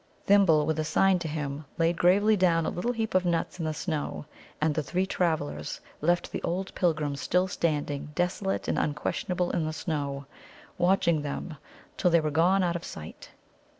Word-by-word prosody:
Thimble, 190 -7 +5
with 160 0 -1
a - - +1
sign 185 +4 +3
to 170 - -4
him, 150 -1 -4
laid 165 0 +2
gravely 200 +6 +4
down 170 -4 +3
a - - -1
little 235 +8 -1
heap 225 -2 -3
of 185 0 +3
nuts 175 +1 -1
in 165 - -2
the 155 - 0
snow. 150 -2 -3 0.3
And 155 0 +2
the 155 - 0
three 180 +5 -1
travellers 155 - -2 0.2
left 175 +3 +1
the - - -4
old 190 +3 -3
pilgrim 155 -5 0
still 180 +6 +1
standing 150 -5 -2
desolate 185 +2 -1
and - - +1
unquestionable 175 +4 -1
in 165 - 0
the 155 0 -2
snow, 140 -3 -3 0.5
watching 175 -3 +3
them 145 +2 -5 0.4
till 180 - +3
they 170 -1 +5
were 155 -1 -1
gone 180 +5 +3
out 170 -1 0
of 170 - -4
sight. 80 0 -9
165 Hz, 185 wpm, -28 LUFS, 150-180 Hz, 0.5 s, Thimble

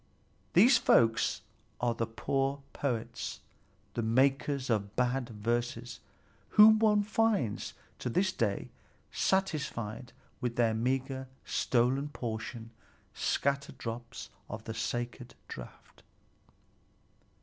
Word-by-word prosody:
These 230 +7 +7
folk 115 -1 +4 0.6
are 120 0 +1
the 115 -1 -2
poor 135 +4 -1
poets, 125 -6 -3 0.5
the 120 - -1
makers 135 +3 +2
of 100 -2 -1
bad 125 0 0
verses, 120 +2 -2 0.6
whom 215 +1 +9
one 210 -2 +4
finds 210 - 0 0.2
to - - -2
this 185 +9 +2
day 110 - -1 0.4
satisfied 140 - -1 0.3
with 125 -3 -2
their 115 -2 +3
meagre, 130 +3 -1 0.2
stolen 130 +4 +1
portion, 115 -2 -5 0.4
scattered 140 -1 -1
drops 115 0 -6 0.2
of 110 0 -6
the 110 - -5
sacred 120 +2 -4
draught. - - -11
125 Hz, 100 wpm, -31 LUFS, 115-140 Hz, 0.6 s, whom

